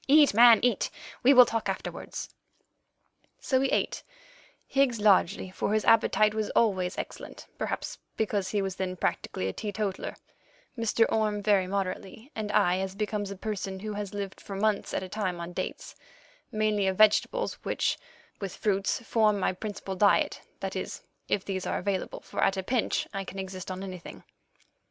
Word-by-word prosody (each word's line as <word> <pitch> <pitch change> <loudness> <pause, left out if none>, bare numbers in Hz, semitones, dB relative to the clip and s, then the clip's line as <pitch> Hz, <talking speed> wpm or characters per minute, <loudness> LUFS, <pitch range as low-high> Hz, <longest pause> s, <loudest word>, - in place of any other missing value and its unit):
Eat, 290 -2 +6
man, 230 0 +8
eat. 245 -5 +2 0.3
We 260 - +6
will 250 -2 +9
talk 225 -1 -2
afterwards." - - -5 1.1
So 260 -2 +1
we 270 0 +1
ate, - - 0 0.6
Higgs 270 -4 +2
largely, 190 -3 +3
for 205 +3 -1
his 215 - +1
appetite 215 -1 +4
was 215 -1 -1
always 185 -5 +2
excellent, - - -7
perhaps - - -3 0.2
because 205 -3 0
he 205 -2 0
was 190 -1 -3
then 185 -1 -2
practically 95 - -2
a 95 - -2
teetotaller; 205 -2 -3 0.6
Mr. 230 -1 +2
Orme 210 -2 +1
very 200 -3 +3
moderately, 200 +6 -4
and 215 -1 -3
I 180 -1 +3
as 190 0 -3
becomes 210 -1 -2
a 200 - -5
person 195 -1 -4
who 215 0 -4
has 205 -2 -4
lived 200 -1 -5
for 195 - -7
months 210 +1 0
at - - -1
a - - -5
time 185 -3 -2
on 170 +1 -6
dates—mainly 215 - -3
of 190 -1 0
vegetables, 215 - +3
which, - - 0 0.4
with 195 -3 -5
fruits, 200 0 0
form 215 -3 +2
my 185 - +1
principal 195 0 -5
diet—that 200 +2 +1
is, - - -5 0.3
if 195 - 0
these 190 -2 -3
are - - 0
available, 195 -2 -2
for - - -3
at 195 - +2
a 190 - -2
pinch 245 +3 0
I 195 -1 -2
can 195 - -9
exist 190 -1 -6
on 185 +1 -5
anything. 185 -3 -8
205 Hz, 165 wpm, -28 LUFS, 190-220 Hz, 1.1 s, will